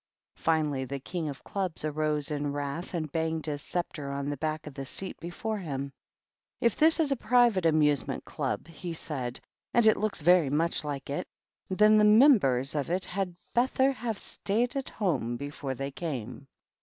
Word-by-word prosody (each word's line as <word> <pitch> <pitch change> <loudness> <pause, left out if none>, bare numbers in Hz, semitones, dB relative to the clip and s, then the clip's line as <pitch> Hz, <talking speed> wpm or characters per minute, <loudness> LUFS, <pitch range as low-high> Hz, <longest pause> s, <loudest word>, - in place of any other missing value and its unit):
Finally 150 -4 +1
the 140 +2 -4
King 160 +3 -4
of 135 -2 -8
Clubs 185 -6 -2
arose 150 -1 -1
in 145 -1 -1
wrath 145 +6 -4
and 155 -3 -3
banged 160 -1 -1
his 145 -2 -2
sceptre 155 -5 -4
on 140 +1 -2
the 145 - -4
back 155 +2 -2
of 150 - -8
the 135 0 -5
seat 190 +8 -5
before 210 +5 -4
him. 140 -5 -4 0.3
" - - -65
If 235 - +2
this 320 +2 +4
is 305 -3 +2
a - - +3
proivate 235 -8 +3
amusement 150 -3 +2
club," - - -3
he 170 +1 -6
said, 130 -6 -4 0.4
"and 235 - +5
it 220 - +6
looks 215 -3 -1
vary 175 -2 +5
much 160 +3 +1
like 140 -2 -4
it, 145 - -3 0.4
then 210 +3 +5
the - - +5
numbers 210 - +5
of 145 -1 -2
it 185 +2 0
had 185 -2 -3 0.2
betther 260 +2 +3
have 240 -5 -3
staid 235 +8 -1
at 270 -1 -2
home 150 - -1
before 140 0 -5
they 135 +2 -4
came." 135 -4 -5
160 Hz, 180 wpm, -29 LUFS, 140-200 Hz, 0.4 s, it